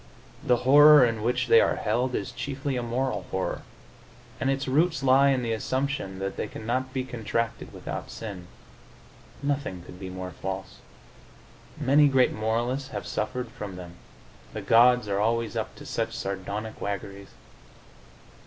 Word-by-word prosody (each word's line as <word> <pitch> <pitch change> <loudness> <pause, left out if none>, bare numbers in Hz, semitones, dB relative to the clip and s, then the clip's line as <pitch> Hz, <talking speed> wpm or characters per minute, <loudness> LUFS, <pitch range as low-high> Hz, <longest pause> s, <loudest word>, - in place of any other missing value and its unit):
The 125 - +4
horror 145 0 +8
in 115 -2 -1
which 120 +3 0
they 460 +1 +6
are - - +2
held 125 +1 0
is 100 - -3
chiefly 135 +3 -4
a 125 - -1
moral 125 +3 -2
horror, 95 0 -2 0.8
and 135 - 0
its 135 +1 -1
roots 150 +1 +2
lie 135 +1 +5
in 130 -2 +1
the 115 -1 -1
assumption 130 -4 -2
that 95 +1 -4
they - - -2
cannot 130 +5 -3
be 130 0 -2
contracted 115 -1 -3
without - - -6
sin. 100 -5 -7 1.0
Nothing 140 -11 -2
could 90 0 -12
be 95 - -6
more 95 0 -6
false. 95 +1 -6 1.0
Many 145 +3 +5
great 135 -2 +3
moralists 120 +5 -1
have 105 -5 -5
suffered 120 +3 -3
from 105 -7 -7
them: 90 -1 -9 0.6
the - - -4
gods 125 0 +5
are 100 -1 0
always 115 +1 0
up - - -3
to - - -12
such - - -3
sardonic 100 +3 -5
waggeries. 100 0 -5
120 Hz, 155 wpm, -26 LUFS, 100-135 Hz, 1.0 s, horror